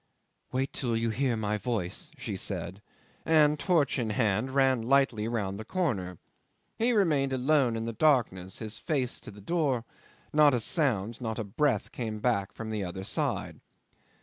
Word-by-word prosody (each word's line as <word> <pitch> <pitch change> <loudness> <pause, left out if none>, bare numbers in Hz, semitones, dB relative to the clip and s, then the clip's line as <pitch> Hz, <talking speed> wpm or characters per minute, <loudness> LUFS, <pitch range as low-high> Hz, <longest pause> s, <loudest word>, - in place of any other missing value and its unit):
"Wait 130 +1 -1
till 120 -3 -1
you 115 0 0
hear 125 0 0
my 105 -1 -1
voice," 100 -6 -3
she - - -4
said, 95 +4 -4 0.4
and, 150 -2 +4
torch 155 -6 +2
in 115 -3 -1
hand, 105 +2 +1
ran 130 -2 +3
lightly 125 -3 +2
round 100 -4 -2
the - - -5
corner. 105 - -2 0.6
He 235 +2 +3
remained 150 - +2
alone 130 -2 +2
in 115 0 -3
the 115 - -3
darkness, 110 - +1
his 110 -1 -6
face 140 -7 -1
to - - -10
the 100 0 -12
door: 135 - 0 0.5
not 150 -3 +6
a - - +1
sound, 120 - 0
not 110 -2 -3
a 115 - -2
breath 110 +3 0
came 110 -3 -4 0.3
from 110 -1 -6
the 105 -2 -2
other 95 +1 -5
side. - - -1
120 Hz, 165 wpm, -29 LUFS, 105-140 Hz, 0.6 s, not